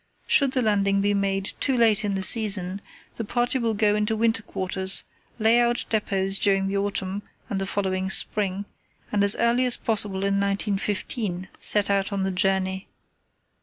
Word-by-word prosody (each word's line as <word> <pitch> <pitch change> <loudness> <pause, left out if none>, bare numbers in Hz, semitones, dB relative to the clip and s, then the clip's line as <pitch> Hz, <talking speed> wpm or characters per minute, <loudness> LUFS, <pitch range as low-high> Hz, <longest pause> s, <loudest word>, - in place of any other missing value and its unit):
Should 275 -2 +3
the 255 - +1
landing 200 -2 +1
be 205 +1 +1
made 195 -1 -1
too 265 -3 +1
late 220 -2 +3
in 200 -1 -1
the 190 - -2
season, 195 -3 +2 0.4
the 230 - -3
party 240 +4 -1
will 230 -2 -1
go 210 0 +2
into 210 +1 0
winter 225 0 +1
quarters, 190 -1 -1 0.3
lay 225 +1 +3
out 240 0 +1
depots 195 -3 0
during 195 -1 +2
the 195 - -3
autumn 195 0 -2 0.3
and 195 -1 -2
the 195 - -3
following 190 -1 -2
spring, 200 0 0 0.5
and 205 -1 +1
as 200 0 +6
early 240 +2 +2
as 245 - +3
possible 205 -3 0
in 200 0 +1
1915 200 -1 -2
set 205 -1 +2
out 195 0 0
on 200 -1 -2
the 190 - -1
journey. 190 0 -1
200 Hz, 170 wpm, -24 LUFS, 195-220 Hz, 0.5 s, as